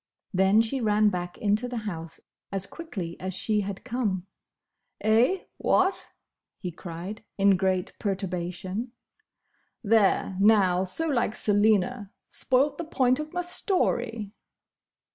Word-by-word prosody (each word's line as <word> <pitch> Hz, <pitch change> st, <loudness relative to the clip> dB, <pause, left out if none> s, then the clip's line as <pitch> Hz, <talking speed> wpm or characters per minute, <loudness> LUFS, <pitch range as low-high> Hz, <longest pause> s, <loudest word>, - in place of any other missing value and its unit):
Then 190 Hz, +4 st, +4 dB
she 255 Hz, +4 st, -2 dB
ran 210 Hz, -1 st, +3 dB
back 175 Hz, -2 st, -4 dB
into 210 Hz, +3 st, +1 dB
the 245 Hz, -1 st, -4 dB
house 165 Hz, -5 st, -5 dB, 0.3 s
as 195 Hz, -1 st, -1 dB
quickly 195 Hz, -, -6 dB
as 185 Hz, 0 st, -4 dB
she 210 Hz, +1 st, +1 dB
had 200 Hz, -1 st, -5 dB
come. 225 Hz, -7 st, -2 dB, 0.7 s
"Eh? 235 Hz, -, +3 dB
What?" 380 Hz, +1 st, +1 dB, 0.5 s
he 180 Hz, -, -5 dB
cried, 175 Hz, +5 st, -7 dB
in 200 Hz, 0 st, +5 dB
great 185 Hz, -1 st, +1 dB
perturbation. 190 Hz, +3 st, -3 dB, 0.9 s
"There, 200 Hz, -3 st, +3 dB
now!—So 195 Hz, -, +3 dB
like 240 Hz, -6 st, 0 dB
Selina! 210 Hz, 0 st, +2 dB, 0.2 s
Spoilt 275 Hz, +3 st, +1 dB
the -, -, -2 dB
point 255 Hz, -4 st, +2 dB
of 305 Hz, 0 st, -5 dB
my 355 Hz, -, -1 dB
story!" 240 Hz, -, 0 dB
210 Hz, 120 wpm, -27 LUFS, 190-245 Hz, 0.9 s, in